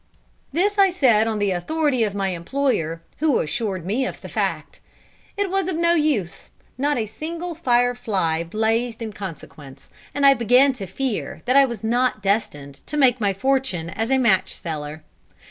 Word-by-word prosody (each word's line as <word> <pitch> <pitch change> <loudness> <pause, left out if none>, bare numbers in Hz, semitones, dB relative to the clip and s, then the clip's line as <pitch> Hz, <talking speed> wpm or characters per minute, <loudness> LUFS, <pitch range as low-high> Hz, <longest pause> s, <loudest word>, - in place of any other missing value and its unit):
This 400 +7 0
I 390 -1 +6
said 240 -11 +3
on 220 -1 -1
the 205 -1 +1
authority 280 - 0
of 205 -2 -2
my 195 -1 0
employer, 170 - -1 0.2
who 305 -3 +3
assured 190 0 -3
me 220 +8 0
of - - -7
the - - -9
fact. - - -3 0.6
It 400 -2 -1
was 390 -2 0
of 370 - -2
no 340 +1 +3
use; 295 - -1 0.3
not 290 +2 0
a 225 - 0
single 335 +9 -6
"fire 245 -6 +2
fly" 185 -9 -1
blazed 225 +5 -1
in 220 -2 -6
consequence, 155 -8 -10 0.2
and 285 -1 +2
I 275 - +8
began 255 +3 +4
to 200 -7 -7
fear 240 +4 -4
that 255 +1 +1
I 275 0 +7
was 235 -5 -6
not 240 -1 0
destined 145 -9 -2
to 300 - -4
make 255 -4 +4
my 200 -1 +2
fortune 225 -7 -1
as 225 +5 -3
a 265 - +3
match 215 -7 +2
seller. 155 -1 -6
235 Hz, 180 wpm, -22 LUFS, 195-275 Hz, 0.6 s, I